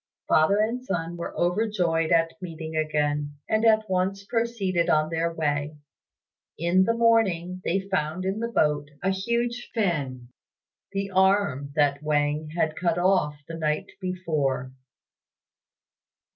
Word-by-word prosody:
Father 155 +6 +4
and 230 +4 0
son 175 -6 -3
were 170 - -6
overjoyed 175 -3 +1
at 165 -1 +3
meeting 160 -2 -6
again, 150 -1 0
and 220 0 +1
at 220 -1 +4
once 190 +1 -1
proceeded 200 -7 0
on 155 +1 +2
their 165 +1 0
way. 150 -2 -2 0.8
In 175 +3 +3
the 230 - +1
morning 190 -6 +2
they 190 +3 0
found 185 -2 -2
in 195 +3 -1
the 230 - -1
boat 150 -10 +1
a 190 - +2
huge 235 +5 -2
fin 140 - -1 0.6
the 195 0 -3
arm 190 -8 +2
that 145 -1 +2
Wang 150 0 0
had 160 -2 +1
cut 170 -1 0
off 180 -4 +2
the 165 - -7
night 155 -2 -2
before. 155 -9 -2
175 Hz, 130 wpm, -26 LUFS, 155-195 Hz, 0.8 s, Father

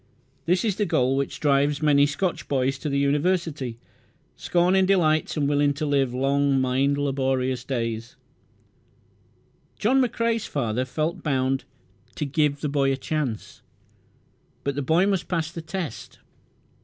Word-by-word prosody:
This 180 +5 +2
is 205 -4 0
the 210 - +1
goal 130 +1 +2
which 140 0 -2
drives 145 +1 +2
many 145 -1 +5
Scotch 175 +5 -2
boys 135 0 0
to 150 - -3
the 140 - 0
University, 145 -3 0 0.6
scorning 185 +2 +2
delights 160 -5 +2
and 145 -2 +1
willing 145 0 +2
to 155 +1 -2
live 140 -3 +1
long, 135 +2 +1
mind 130 +2 +1
laborious 130 -3 -1
days. 115 -3 -3 1.6
John 260 +5 +3
McCrae's 230 -2 0
father 125 -2 -1
felt 160 +7 -2
bound 135 -3 0 0.5
"to 150 - -2
give 145 0 0
the - - -1
boy 140 -1 +1
a 135 - -1
chance," 135 -5 -4 1.0
but 140 - -1
the 145 - -3
boy 160 +7 +3
must 195 -3 0
pass 165 -3 -2
the 165 - -6
test. 165 - -6
145 Hz, 145 wpm, -24 LUFS, 135-165 Hz, 1.6 s, many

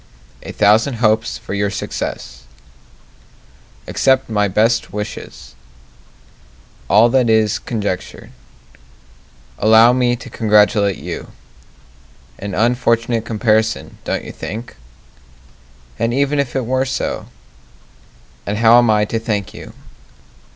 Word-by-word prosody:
A - - -8
thousand 110 +5 +3
hopes 110 0 +1
for - - -8
your 100 0 0
success 65 -8 -6 1.4
Accept 130 -2 +1
my 105 -1 +1
best 110 +4 +1
wishes 100 -11 -7 1.4
All 105 +4 +6
that 125 -1 +2
is 110 -1 +2
conjecture 105 -5 -5 1.3
Allow 110 +3 +6
me 125 -1 +1
to 125 - -11
congratulate 105 -3 +2
you - - -7 1.1
An 100 -1 -5
unfortunate 115 0 +1
comparison, 110 0 0
don't - - -3
you - - -8
think? 115 +4 -7 1.2
And 115 +1 0
even 140 +1 +1
if 135 -3 -2
it 130 -3 -1
were 130 +2 0
so? 130 - -3 1.2
And 105 +1 -2
how 115 +2 +6
am 120 -2 +2
I 105 -1 +3
to 115 +2 -3
thank 105 -4 -3
you? - - -10
110 Hz, 110 wpm, -18 LUFS, 105-120 Hz, 1.4 s, All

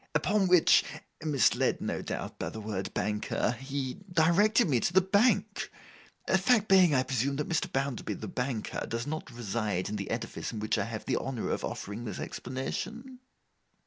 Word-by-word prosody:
Upon 200 0 +2
which, 180 -2 +6 0.4
misled 150 -5 +2
no - - -3
doubt - - -5
by - - -2
the 110 - -7
word 105 -3 -4
Banker, 105 +2 0
he 135 +1 -4
directed 185 +7 +4
me 130 -6 +2
to 175 - 0
the 185 - +6
Bank. 200 +6 +2 0.6
Fact 230 -5 +3
being, 185 -6 +6
I 130 - +3
presume, 130 +2 0
that 150 +1 -2
Mr. 165 - -1
Bounderby 135 -2 -2
the - - -7
Banker 125 -3 -3
does 115 +1 -2
not 155 -1 -4
reside 110 -5 -2
in 105 - -3
the 100 - -5
edifice 115 0 -4
in 110 - -5
which 105 0 0
I 100 - 0
have 110 -1 -6
the 130 - +1
honour 130 -4 -3
of - - -2
offering 105 +4 -5
this 105 - -5
explanation? 225 - -5
135 Hz, 175 wpm, -30 LUFS, 115-175 Hz, 0.6 s, which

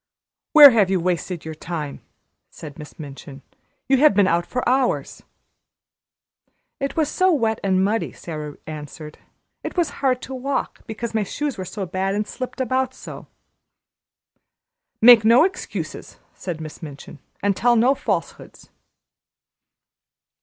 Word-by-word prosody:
"Where 295 -3 +11
have 210 -5 +3
you 190 -1 +1
wasted 175 -1 -2
your 160 - -5
time?" 155 -2 -6 0.5
said 150 -1 -11
Miss 150 - -11
Minchin. 140 -2 -10 0.4
"You 270 - +4
have 295 -5 +5
been 205 -1 +5
out 170 -1 +1
for 250 - -3
hours!" 255 +1 0 1.6
"It 275 0 -3
was 315 -2 +2
so 370 +5 +2
wet 225 -8 +1
and 190 -1 +2
muddy," 220 +3 -1
Sara 150 -3 -7
answered. 150 0 -9 0.4
"It - - -6
was 345 -3 +1
hard 260 -2 +2
to 265 - -7
walk, 265 +1 -3
because 225 +1 -5
my 220 - +1
shoes 280 +8 -3
were 190 -3 -6
so 195 +1 -5
bad 190 +2 -2
and 210 +1 -1
slipped 255 0 -7
about 260 +1 -1
so." - - -10 1.8
"Make 235 -2 +9
no 230 +6 +6
excuses," 375 +1 -4 0.2
said 175 -4 -6
Miss 155 -1 -9
Minchin, 145 -1 -10 0.2
"and 200 -1 +2
tell 240 +4 +3
no 240 +4 +4
falsehoods." - - -5
210 Hz, 140 wpm, -22 LUFS, 165-260 Hz, 1.8 s, Where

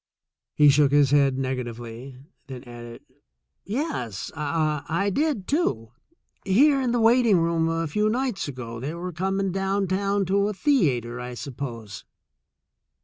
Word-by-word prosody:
He 150 -1 +6
shook 140 0 +4
his 145 -2 +4
head 140 -2 +3
negatively, 125 -1 -5 0.3
then 130 -2 -8
added: 120 -1 -10 0.6
"Yes, 195 - -4
I 155 +5 -1
did, 285 -9 -1
too; 120 - -1 0.5
here 270 +8 +4
in 250 -2 0
the 240 - +1
waiting 230 -2 +4
room 165 -1 +1
a 165 0 -1
few 210 +7 0
nights 245 - -1
ago. 120 -4 -7
They 145 +7 -4
were 180 +1 -5
coming 195 +3 -1
down 195 +1 0
town 195 +2 0
to 200 +2 +1
a 210 - -2
thea 185 - +2
ter, 120 +1 -7
I 125 0 -6
suppose." 120 -6 -7
165 Hz, 145 wpm, -25 LUFS, 125-200 Hz, 0.6 s, He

